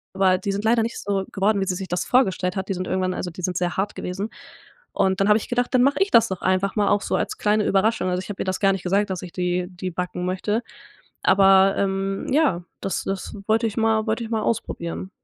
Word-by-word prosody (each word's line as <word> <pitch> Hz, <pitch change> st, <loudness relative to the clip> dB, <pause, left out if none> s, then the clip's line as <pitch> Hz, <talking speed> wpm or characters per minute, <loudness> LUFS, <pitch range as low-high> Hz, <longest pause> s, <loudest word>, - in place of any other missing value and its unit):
aber 190 Hz, -1 st, +3 dB
die 195 Hz, +1 st, -2 dB
sind 200 Hz, +2 st, -3 dB
leider 230 Hz, +1 st, +3 dB
nicht 230 Hz, +1 st, -3 dB
so 195 Hz, -1 st, -1 dB
geworden, 200 Hz, +1 st, +1 dB
wie 195 Hz, -, -1 dB
sie 180 Hz, -, 0 dB
sich 190 Hz, 0 st, -6 dB
das 180 Hz, -, -1 dB
vorgestellt 190 Hz, -7 st, +1 dB
hat. 190 Hz, 0 st, -3 dB
Die 195 Hz, -, -1 dB
sind 185 Hz, 0 st, -4 dB
irgendwann 185 Hz, -1 st, -1 dB
also, 180 Hz, -, -4 dB
die 180 Hz, +2 st, -9 dB
sind 180 Hz, 0 st, -1 dB
sehr 175 Hz, 0 st, -1 dB
hart 200 Hz, +2 st, -1 dB
gewesen 195 Hz, +4 st, -4 dB, 0.6 s
und 190 Hz, -1 st, +1 dB
dann 195 Hz, -, +3 dB
habe 210 Hz, +1 st, +6 dB
ich -, -, -8 dB
gedacht: 245 Hz, 0 st, 0 dB
„Dann 250 Hz, -, +5 dB
mach 280 Hz, +2 st, +4 dB
ich 390 Hz, +1 st, +2 dB
das 230 Hz, 0 st, +5 dB
doch 190 Hz, -2 st, -5 dB
einfach 185 Hz, +1 st, +1 dB
mal 205 Hz, -1 st, +2 dB
auch 205 Hz, 0 st, +2 dB
so -, -, -2 dB
als -, -, -3 dB
kleine 210 Hz, 0 st, +2 dB
Überraschung.“ 195 Hz, -1 st, +2 dB
Also, 180 Hz, 0 st, -1 dB
ich -, -, -9 dB
habe 200 Hz, -, -6 dB
ihr -, -, -6 dB
das 185 Hz, 0 st, -2 dB
gar 195 Hz, -1 st, +4 dB
nicht 190 Hz, -2 st, -4 dB
gesagt, 200 Hz, +3 st, +1 dB
dass 185 Hz, -2 st, -3 dB
ich 180 Hz, -2 st, -8 dB
die 180 Hz, 0 st, -1 dB
die 185 Hz, 0 st, -5 dB
backen 180 Hz, +1 st, -4 dB
möchte, 205 Hz, +5 st, -1 dB, 0.6 s
aber, 195 Hz, 0 st, +5 dB
ähm, 195 Hz, 0 st, -1 dB
ja, 270 Hz, -, +2 dB, 0.2 s
das 195 Hz, -, -3 dB
das 195 Hz, +2 st, -4 dB
wollte 225 Hz, +1 st, +2 dB
ich 215 Hz, -, -8 dB
mal 220 Hz, 0 st, +2 dB
wollte 225 Hz, +1 st, -1 dB
ich 225 Hz, -, -8 dB
mal 220 Hz, -2 st, 0 dB
ausprobieren. 185 Hz, -4 st, -3 dB
195 Hz, 255 wpm, -23 LUFS, 185-215 Hz, 0.6 s, habe